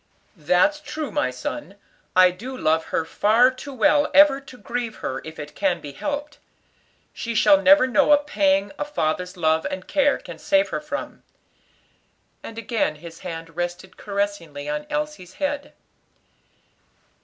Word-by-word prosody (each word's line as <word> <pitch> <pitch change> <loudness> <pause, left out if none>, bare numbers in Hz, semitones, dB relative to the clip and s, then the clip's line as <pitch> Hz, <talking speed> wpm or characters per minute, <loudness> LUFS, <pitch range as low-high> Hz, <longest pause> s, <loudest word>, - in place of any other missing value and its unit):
"That's 180 - +2
true, 300 -1 -5
my 130 - 0
son; 195 - -6 0.4
I 185 0 +7
do 250 +9 -8
love 160 -6 +1
her 160 - -1
far 225 +9 +4
too 260 +2 -9
well 290 +3 +3
ever 290 -2 +7
to 265 -2 -13
grieve 235 +1 -4
her 130 - -4
if 160 0 -9
it 150 0 -8
can 185 -4 0
be 145 - -8
helped. 290 - -5 0.7
She 235 -1 -4
shall 295 +6 +5
never 290 -2 +7
know 280 +3 +3
a 295 - +8
pang 200 -9 +1
a - - 0
father's 180 - -2
love 160 -1 +2
and 190 -1 -6
care 285 -1 +2
can - - -11
save 295 0 +2
her - - -3
from." 300 - -6 1.2
And 225 - -9
again 230 -8 -1
his 165 +2 -11
hand 165 -2 -7
rested 175 +2 -4
caressingly 200 -8 -4
on 300 0 -3
Elsie's 300 -11 -4
head. 285 0 -3
220 Hz, 155 wpm, -23 LUFS, 175-290 Hz, 1.2 s, a